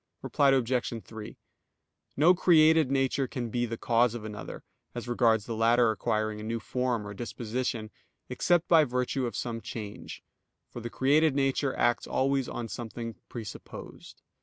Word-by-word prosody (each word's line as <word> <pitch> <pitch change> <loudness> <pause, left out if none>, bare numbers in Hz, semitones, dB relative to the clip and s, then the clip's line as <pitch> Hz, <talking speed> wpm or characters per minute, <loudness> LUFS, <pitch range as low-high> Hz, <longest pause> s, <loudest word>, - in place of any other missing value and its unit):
Reply 140 -2 +3
Obj. 125 -3 0
3: 110 -2 -9 0.8
No 160 +6 +6
created 160 -4 +5
nature 135 0 +1
can 120 -2 -5
be 120 +1 0
the 115 0 -4
cause 120 0 +2
of 110 -2 -6
another, 105 -1 -7 0.3
as 120 0 -5
regards 115 -3 +2
the 115 - -4
latter 115 +1 +4
acquiring 110 -1 -1
a - - -7
new 115 +1 -2
form, 125 -2 -2
or 105 - -6
disposition, 115 0 -4 0.4
except 175 +7 +1
by 165 -2 +6
virtue 125 0 -1
of 115 - -6
some 115 +1 -3
change; 105 -3 -8 0.5
for - - -7
the 120 0 -5
created 145 +4 +3
nature 135 0 +1
acts 120 -1 +1
always 135 -1 0
on 120 - -4
something 115 0 -6 0.2
presupposed. 110 -5 -9
120 Hz, 155 wpm, -29 LUFS, 115-135 Hz, 0.8 s, No